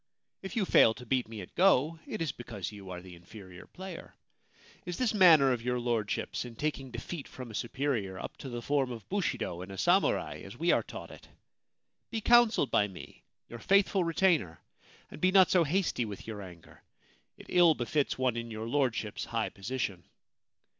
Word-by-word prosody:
If 190 +4 -7
you 215 -4 +1
fail 115 -9 +5
to 125 - -11
beat 125 0 0
me 110 -2 -7
at 90 - -11
go, 165 -4 +3
it - - -3
is 155 - -2
because 110 -6 -7
you 100 -3 -11
are 90 -1 -7
the 95 -1 -11
inferior 90 +1 -13
player. 185 -2 -9 0.7
Is 180 -1 -5
this 245 -4 +1
manner 165 -9 +7
of 120 -2 -1
your 125 +1 -1
Lordship's 115 -4 -2
in 120 -2 -9
taking 140 -1 -3
defeat 130 +6 -6
from 125 -3 -9
a - - -11
superior 115 -5 -2
up - - -7
to 135 - -8
the 120 -1 -5
form 140 -2 0
of 115 -3 -8
bushido 175 - -2
in 95 - -8
a 95 - -8
samurai, 180 - +1
as - - -10
we - - +2
are - - +3
taught - - -9
it? - - -14 0.8
Be 225 - -2
counselled 235 - +4
by 105 - +3
me, 95 -3 -12 0.3
your 120 - -9
faithful 195 - +3
retainer, 165 - +1 0.5
and - - -10
be 185 - +4
not 190 -1 +6
so 180 -2 +5
hasty 165 -5 0
with 105 -2 -8
your 110 -2 -6
anger 90 -3 -13 0.3
— - - -38
it - - -13
ill 175 -3 +5
befits 140 +4 -1
one 130 -2 +1
in 115 0 -4
your 110 0 -5
Lordship's 120 -5 -1
high - - -2
position.' 100 -3 -4
125 Hz, 195 wpm, -30 LUFS, 110-170 Hz, 0.8 s, manner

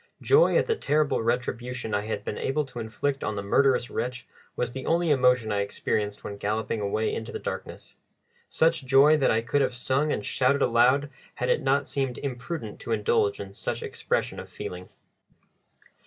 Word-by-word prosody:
Joy 450 +4 +5
at - - +3
the 455 - +1
terrible 150 - +1
retribution 125 0 -2
I 100 - +1
had 110 - -3
been - - -4
able 150 +2 0
to 125 -2 -9
inflict 135 +5 -2
on 105 - -2
the 100 - -4
murderous 125 +3 +2
wretch 125 -1 -3 0.3
was 120 -1 -2
the 130 +1 -6
only 170 -1 +2
emotion 125 -5 +3
I 100 - +1
experienced 105 +1 -2
when 100 - -6
galloping 110 +2 -2
away 110 +2 -1
into 110 - -5
the - - -4
darkness - - -7 0.5
such 160 -3 +2
joy 140 +4 +6
that 135 - +2
I 110 - +2
could 115 +5 0
have 130 -2 0
sung 135 +5 0
and 105 - -2
shouted 135 +2 +2
aloud 130 +5 +3 0.2
had 125 - -2
it - - +2
not 140 +1 +1
seemed 135 -3 -2
imprudent 125 -3 -5
to - - -6
indulge 105 -1 +1
in 100 -1 -7
such - - -4
expression - - -2
of - - -9
feeling. 90 0 -7
125 Hz, 185 wpm, -26 LUFS, 110-140 Hz, 0.5 s, joy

